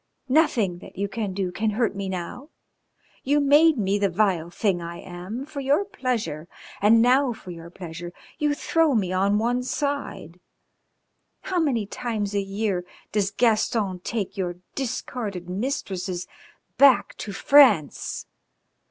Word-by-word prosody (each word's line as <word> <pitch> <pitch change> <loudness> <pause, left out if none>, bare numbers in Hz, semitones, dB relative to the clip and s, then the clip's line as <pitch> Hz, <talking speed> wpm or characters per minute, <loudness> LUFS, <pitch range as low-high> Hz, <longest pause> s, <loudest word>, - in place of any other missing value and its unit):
Nothing 235 - +2
that - - -13
you 200 +1 -1
can 205 -1 -3
do 185 -1 -2
can 215 +4 -1
hurt 235 -4 +1
me 195 -1 -3
now. 190 - -6 0.7
You 290 +2 +2
made 295 +2 +5
me 200 -1 +1
the 200 -1 +2
vile 180 -3 +1
thing 180 0 0
I 170 0 -6
am 185 +8 -7
for 300 -1 -7
your 280 +8 +2
pleasure, 245 - -3 0.3
and 225 +3 +6
now 255 +1 +4
for 185 -5 -10
your 170 0 -9
pleasure 175 -1 -8 0.3
you 295 -1 +1
throw 320 -2 +2
me 185 -4 0
on 200 +2 +2
one 240 +3 +1
side.... 270 - -3 1.0
How 370 -2 -1
many 260 -10 +1
times 210 -2 -3
a 200 - +1
year 195 -2 -2 0.3
does 205 -2 +1
Gaston 215 -3 +1
take 200 +1 -3
your 180 -3 -2 0.2
discarded 220 -7 -4
mistresses 185 -4 -3 0.5
back 275 -2 +5
to 205 - -6
France?" 255 - +4
210 Hz, 145 wpm, -24 LUFS, 185-255 Hz, 1.0 s, and